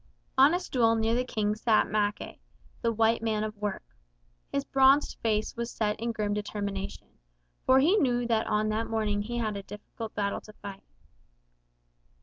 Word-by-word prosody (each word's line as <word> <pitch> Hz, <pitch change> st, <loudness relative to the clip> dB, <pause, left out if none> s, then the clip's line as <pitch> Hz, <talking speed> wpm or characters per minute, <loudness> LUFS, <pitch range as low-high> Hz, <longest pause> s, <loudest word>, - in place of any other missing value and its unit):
On 275 Hz, +5 st, +6 dB
a -, -, +1 dB
stool 235 Hz, -10 st, +2 dB
near 225 Hz, 0 st, +1 dB
the 245 Hz, +1 st, +1 dB
King 215 Hz, -4 st, -1 dB
sat 215 Hz, 0 st, +2 dB
Mackay, 205 Hz, 0 st, -2 dB, 0.4 s
the 230 Hz, -, +1 dB
White 225 Hz, +1 st, +2 dB
Man 220 Hz, -2 st, 0 dB
of 215 Hz, 0 st, -4 dB
Work. 205 Hz, -1 st, -3 dB, 0.7 s
His 280 Hz, -, 0 dB
bronzed 270 Hz, +2 st, +4 dB
face 215 Hz, -2 st, 0 dB
was 235 Hz, 0 st, -3 dB
set 210 Hz, -3 st, -1 dB
in 230 Hz, +1 st, -1 dB
grim 210 Hz, -2 st, -1 dB
determination, 200 Hz, -1 st, -4 dB, 0.6 s
for 260 Hz, -, +6 dB
he 340 Hz, +10 st, +4 dB
knew 245 Hz, -, +2 dB
that 225 Hz, -1 st, +1 dB
on 215 Hz, 0 st, +1 dB
that 220 Hz, +1 st, -1 dB
morning 215 Hz, -2 st, 0 dB
he 240 Hz, +3 st, -4 dB
had 215 Hz, -3 st, -1 dB
a 200 Hz, -, -4 dB
difficult 215 Hz, +2 st, -9 dB
battle 200 Hz, -1 st, -1 dB
to 215 Hz, -, -14 dB
fight. 200 Hz, -2 st, -9 dB
220 Hz, 170 wpm, -28 LUFS, 210-235 Hz, 0.7 s, On